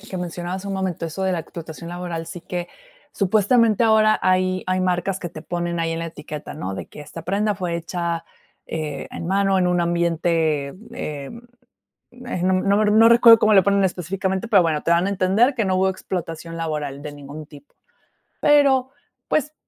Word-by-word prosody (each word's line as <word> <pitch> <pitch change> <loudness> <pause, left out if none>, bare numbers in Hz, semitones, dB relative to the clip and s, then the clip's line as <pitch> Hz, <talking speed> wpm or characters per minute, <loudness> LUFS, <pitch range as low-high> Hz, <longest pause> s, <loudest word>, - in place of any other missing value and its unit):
que 195 -2 -8
mencionabas 180 +1 -4
hace 200 - -6
un 195 - -2
momento, 185 -3 -2
eso 165 +4 -5
de 190 - +1
la 180 - 0
explotación 165 0 -8
laboral, 175 -2 -5
sí 175 - -8
que 175 +1 -5 0.5
supuestamente 215 +3 +3
ahora 215 -1 +4
hay 185 0 +1
hay 185 0 0
marcas 185 +1 -1
que 175 - -4
te 155 -2 -10
ponen 175 0 -3
ahí 165 0 -1
en 165 - -3
la 165 - -3
etiqueta, 150 -2 -8
¿no?, 95 +1 -5
de - - -6
que - - -12
esta 160 +3 -9
prenda 205 +4 0
fue 175 -2 -3
hecha, 170 0 -3 0.4
eh, 155 -3 -4
en 165 - -6
mano, 195 0 +2
en 180 -1 +2
un 175 0 +1
ambiente, 165 -4 0 0.2
eh 145 -8 -5 0.9
eh, 245 - -4
no 185 - +3
m 185 - +1
no 205 +2 +3
re 210 - +3
no 225 +2 +7
recuerdo 235 -1 +8
cómo 215 - +4
le 195 -2 +7
ponen 200 +1 +3
específicamente, 190 +2 -2
pero 200 -5 +5
bueno, 155 -3 0
te 170 - +2
dan 170 +2 +3
a - - 0
entender 200 +7 +2
que 225 - +1
no 190 -1 0
hubo 190 +1 +2
explotación 165 -3 -5
laboral 150 -4 -4
de 150 -1 -6
ningún 145 +2 -10
tipo. 145 -1 -16 0.7
Pero 275 -3 +4 0.4
pues 300 0 0
180 Hz, 200 wpm, -22 LUFS, 165-195 Hz, 0.9 s, recuerdo